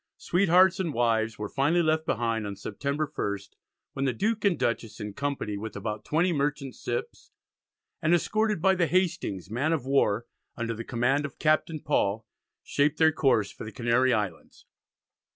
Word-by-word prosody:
Sweethearts 185 +1 +4
and 170 -6 -2
wives 115 -2 +1
were 105 - -4
finally 150 +9 +2
left 160 0 +1
behind 115 -2 0
on 100 - -5
September 140 +10 -3
1st, 100 -9 -4 0.4
when 135 - -2
the 130 - +1
Duke 215 - -1
and 200 -4 +3
Dutchess 115 -1 -2
in 105 -1 -5
company 140 -6 -3
with 110 +1 -6
about 105 +1 -4
20 170 +3 +2
merchant 140 -2 -1
ships, 120 0 -5 0.7
and 155 - +2
escorted 210 +2 +1
by 190 -1 +5
the 175 -3 +1
Hastings 170 - -1
man 135 +8 0
of 145 -6 -2
war, 120 -5 +2 0.3
under 115 0 -2
the 115 +1 -6
command 125 +5 +1
of 140 -3 -6
Captain 155 0 +1
Paul, 110 -7 0 0.4
shaped 145 +2 +1
their 160 -1 +5
course 130 -9 +2
for - - -10
the 110 - -7
Canary 120 +3 +2
Islands. 100 -9 -3
135 Hz, 170 wpm, -27 LUFS, 110-160 Hz, 0.7 s, by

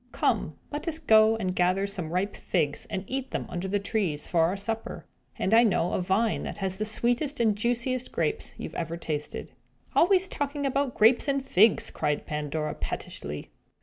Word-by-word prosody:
Come, - - 0 0.2
let 295 +3 -5
us 320 -1 -1
go 220 -7 +5
and 185 -4 -2
gather 185 +2 +2
some 185 -5 -4
ripe 185 +4 -1
figs, 150 -5 -1
and 190 - -3
eat 265 +3 -3
them - - -3
under 175 +2 -3
the 200 +2 +1
trees, 195 -7 -1
for 170 - +2
our 185 +4 0
supper. 225 +3 -4 0.3
And 190 - 0
I 230 - +8
know 190 -6 +2
a - - +1
vine 200 +5 +1
that - - -5
has 190 -1 -3
the 215 - -1
sweetest 245 +6 0
and 220 -3 +3
juiciest 240 +3 -1
grapes 445 - -2
you - - -6
ever 170 0 -3
tasted." 150 -3 -4 0.4
"Always 375 +2 +4
talking 285 -3 -3
about 275 -1 0
grapes 230 +6 +5
and 275 -1 0
figs!" 215 -2 +4
cried 150 -1 -1
Pandora, 150 0 -2
pettishly. 75 0 -5
210 Hz, 180 wpm, -27 LUFS, 180-250 Hz, 0.4 s, I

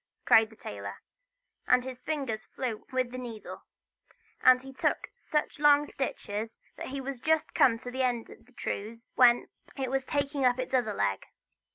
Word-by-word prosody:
cried 220 -1 +6
the 220 - -16
tailor; 100 - -7 0.7
and 250 0 +5
his 255 -1 -7
fingers 265 -8 -3
flew 235 -5 -5
with 255 -1 0
the 255 - -5
needle, 230 -4 -8 0.8
and 255 0 +6
he 270 0 -10
took - - -1
such 300 -11 -2
long 295 0 +6
stitches, 225 -6 -4 0.2
that - - -6
he 275 +1 -4
was 270 -1 -5
just 320 +3 +1
come 230 -3 +5
to 245 +2 -8
the 260 +1 -2
end 245 -3 0
of - - -15
the - - -22
trews, 230 0 -5
when 245 -1 +5 0.3
it 260 -2 -2
was 270 0 +1
taking 280 0 -1
up 250 -1 +4
its 255 +1 -4
other 240 -5 +2
leg. 95 - -1
255 Hz, 180 wpm, -29 LUFS, 230-270 Hz, 0.8 s, cried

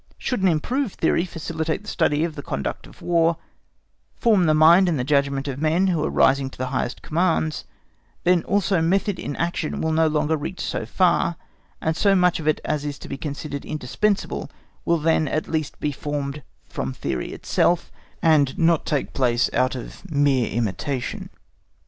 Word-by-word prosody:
Should 250 -6 -2
an 190 - +4
improved 215 - 0
theory 165 +1 +1
facilitate 160 +1 -3
the - - -15
study 150 -5 +1
of 165 -1 -2
the 145 - -7
conduct 70 - -4
of - - -16
War, 165 -1 +2 0.8
form 210 -8 +3
the 155 - +4
mind 170 +4 +6
and 135 -6 -1
judgment 140 -1 +1
of 135 +1 -4
men 160 +4 +2
who 165 -4 0
are - - 0
rising 135 0 +3
to - - -15
the 130 0 -3
highest 130 -1 -2
commands, 160 -2 0 0.6
then 180 -1 +4
also 195 -3 +1
method 190 +3 +1
in 145 - -4
action 170 -2 -2
will 160 - 0
no 160 0 +3
longer 155 0 +1
reach 160 +5 -5
so 110 - -3
far, 170 +3 +2 0.4
and 160 0 -1
so 195 +4 +3
much 180 -2 +3
of 155 - -5
it 155 - +2
as 150 -1 -1
is 145 -1 -4
to - - -10
be - - -3
considered 145 0 -5
indispensable 175 +9 -2 0.4
will 170 - +3
then 160 0 +2
at 155 +3 -2
least 155 -3 -3
be 150 - -1
formed 145 0 -4 0.3
from 65 0 -4
theory 65 -1 -3
itself, 175 0 0 0.3
and 150 -5 +3
not 165 -1 +2
take 145 -3 -1
place 120 -2 +1
out 130 +1 +1
of 130 +9 -9
mere 140 -5 +2
imitation. 120 +4 -3
155 Hz, 180 wpm, -23 LUFS, 140-170 Hz, 0.8 s, mind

